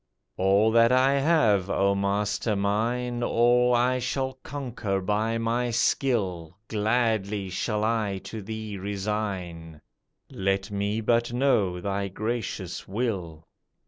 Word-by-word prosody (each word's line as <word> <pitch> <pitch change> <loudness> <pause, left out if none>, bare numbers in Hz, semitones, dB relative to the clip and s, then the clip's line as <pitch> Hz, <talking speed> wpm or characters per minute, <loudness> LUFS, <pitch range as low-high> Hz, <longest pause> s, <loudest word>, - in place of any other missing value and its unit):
"All 100 +4 +3
that 115 +1 +5
I 135 +2 +4
have, 115 - +3
O 100 0 +2
Master 105 +2 0
mine, 120 +5 -1
All 120 +1 +3
I 125 +1 +2
shall 130 +2 -2
conquer 120 -8 -3
by 105 +4 0
my 115 +2 0
skill, 100 - 0
Gladly 105 -3 0
shall 105 +3 -1
I 110 -3 0
to 110 +2 -7
thee 110 -1 -6
resign, 95 -5 -4 0.5
Let 95 +1 -1
me 100 +2 -1
but 120 +1 +1
know 110 -9 +2
thy 100 +1 -2
gracious 110 -3 -4
will." 95 -7 -3
105 Hz, 115 wpm, -26 LUFS, 100-120 Hz, 0.5 s, that